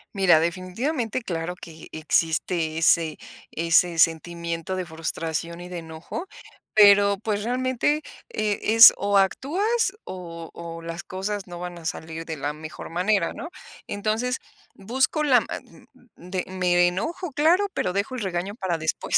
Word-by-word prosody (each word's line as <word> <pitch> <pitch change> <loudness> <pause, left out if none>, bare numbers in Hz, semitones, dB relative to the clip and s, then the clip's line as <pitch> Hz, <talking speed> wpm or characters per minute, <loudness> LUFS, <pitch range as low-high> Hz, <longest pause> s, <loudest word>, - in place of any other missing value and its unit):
Mira, 190 -5 +5
definitivamente, 220 - -2
claro 170 -1 -3
que 160 -1 -11
existe 160 +1 0
ese 165 -1 +3 0.3
ese 170 +1 +2
sentimiento 170 +2 0
de 185 -1 -3
frustración 165 +1 -4
y 180 0 -9
de 180 - -5
enojo, 165 - -7 0.5
pero, 200 -1 +7
pues, 210 0 -2
realmente, 255 +5 0 0.3
eh, 210 -1 -1
es 225 +2 +9
o 200 0 +1
actúas 385 - +1
o 170 -3 -8
o 165 0 -8
las 165 +1 -6
cosas 195 +1 -4
no 175 -1 -8
van 175 0 -6
a 165 - -13
salir 165 0 -5
de 160 -2 -5
la 145 +2 -2
mejor 155 +1 -9
manera, 185 +1 +1
¿no? 340 - -7 0.4
Entonces 220 +5 -1 0.4
busco 260 +9 0
la 260 -4 +5
man - - -9 0.3
de 180 +1 -4
me 180 -1 +3
enojo, 310 - -3
claro, 335 +8 +3
pero - - -1
dejo 200 +7 -2
el 255 - -4
regaño 190 0 -2
para 190 -6 -2
después, 160 0 -2
180 Hz, 145 wpm, -24 LUFS, 165-215 Hz, 0.5 s, es